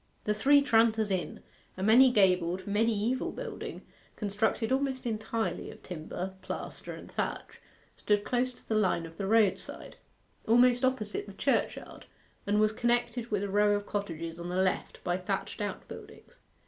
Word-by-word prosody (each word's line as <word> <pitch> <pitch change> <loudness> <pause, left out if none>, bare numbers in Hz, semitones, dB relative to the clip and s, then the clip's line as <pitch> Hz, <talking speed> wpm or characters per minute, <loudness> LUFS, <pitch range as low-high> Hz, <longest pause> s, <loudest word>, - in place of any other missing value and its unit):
The 210 - +1
Three 280 +6 +5
Tranters 225 -4 +3
Inn, 185 -2 -2 0.4
a 185 - -3
many 245 +5 +7
gabled, 185 -4 +2
mediaeval 220 +3 0
building, - - -6 0.3
constructed 220 +3 -1
almost 265 -1 0
entirely 220 -4 -2
of - - -13
timber, 180 +2 -5
plaster, - - -6
and - - -12
thatch, - - -4 0.3
stood 205 -1 +1
close 250 +2 0
to - - -21
the - - -1
line 190 -5 +2
of 165 0 -12
the 195 - -3
roadside, 215 -2 +1 0.5
almost 245 +2 +5
opposite 245 -6 -1
the 200 - -9
churchyard, 275 +7 -1 0.4
and 205 +1 +2
was 215 0 +4
connected 240 0 0
with 205 -2 0
a 200 - -2
row 205 +1 +3
of 205 0 -3
cottages 165 -5 -4
on 170 +1 -5
the 180 - -3
left 185 0 -1
by 175 0 0
thatched 185 - -3
outbuildings. - - -8
210 Hz, 155 wpm, -30 LUFS, 190-240 Hz, 0.5 s, many